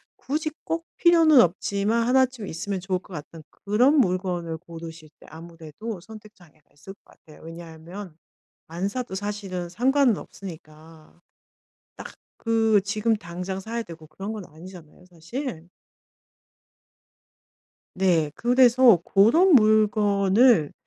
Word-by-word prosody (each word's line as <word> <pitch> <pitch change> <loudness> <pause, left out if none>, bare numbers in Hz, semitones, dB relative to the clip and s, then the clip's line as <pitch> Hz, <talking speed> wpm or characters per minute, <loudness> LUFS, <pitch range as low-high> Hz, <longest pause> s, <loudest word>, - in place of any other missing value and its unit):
굳이 310 +3 -3
꼭 330 0 -4
필요는 325 -5 +6
없지만 205 +5 0
하나쯤 255 -4 +1
있으면 190 +4 -4
좋을 185 0 -2
것 190 - -16
같은 155 +1 -10
그런 240 +9 +1
물건을 180 - -1
고르실 165 -2 -11
때 - - -17
아무래도 165 +5 -9
선택 215 +2 -14
장애가 155 -4 -24
있을 150 +7 -12
것 - - -33
같아요. 155 - -19
왜냐하면 165 +2 -10 0.5
안 175 +4 -3
사도 245 -4 -5
사실은 195 -3 -5
상관은 250 +3 +2
없으니까. 160 -3 -13 0.8
딱 - - -9 0.4
그 225 -3 +2
지금 215 +3 0
당장 180 +1 -6
사야 230 +4 -5
되고 165 -5 -12
그런 195 +8 -7
건 210 -4 -7
아니잖아요 175 +1 -14
사실. 175 - -7 2.3
네. 170 -5 +1
그래서 245 0 +5
고런 280 - +4
물건을 215 - +3
195 Hz, 260 characters per minute, -24 LUFS, 170-230 Hz, 2.3 s, 필요는